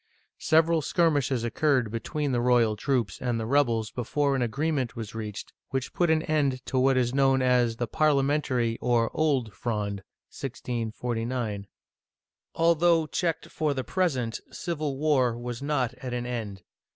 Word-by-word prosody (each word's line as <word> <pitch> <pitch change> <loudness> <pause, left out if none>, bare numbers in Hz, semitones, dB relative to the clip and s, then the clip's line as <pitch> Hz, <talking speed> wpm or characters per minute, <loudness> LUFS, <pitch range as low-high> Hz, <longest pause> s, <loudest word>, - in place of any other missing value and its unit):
Several 160 +1 +3
skirmishes 145 -7 +1
occurred 125 -1 +1
be 115 - -2
tween 145 +5 -2
the 120 -2 +1
royal 120 -3 +3
troops 115 -4 -1
and 120 -2 -1
the 110 - -3
rebels 115 -4 +1
before 140 +4 0
an 130 - 0
agree 140 +7 0
ment 130 -6 -2
was 110 -3 -6
reached 105 -2 -6 0.2
which 130 -1 -3
put 175 -2 +1
an 160 0 +3
end 140 -5 0
to 130 - 0
what 135 0 +3
is 125 -1 +1
known 135 -1 +3
as 125 -2 +3
the 120 - -2
Parliamentary 140 -4 +1
or 120 -2 +2
Old 135 -9 +1
Fronde 100 -2 -3 0.3
(1649). 115 -3 -3 0.9
Although 165 0 +3
checked 165 +1 -2
for 150 -3 -1
the 130 - -2
present, 130 -12 -1
civil 155 -6 -3
war 135 -6 +2
was 120 0 -5
not 135 -4 0
at 125 -2 -4
an 120 0 -3
end. 110 -6 -5
130 Hz, 155 wpm, -27 LUFS, 115-145 Hz, 0.9 s, Several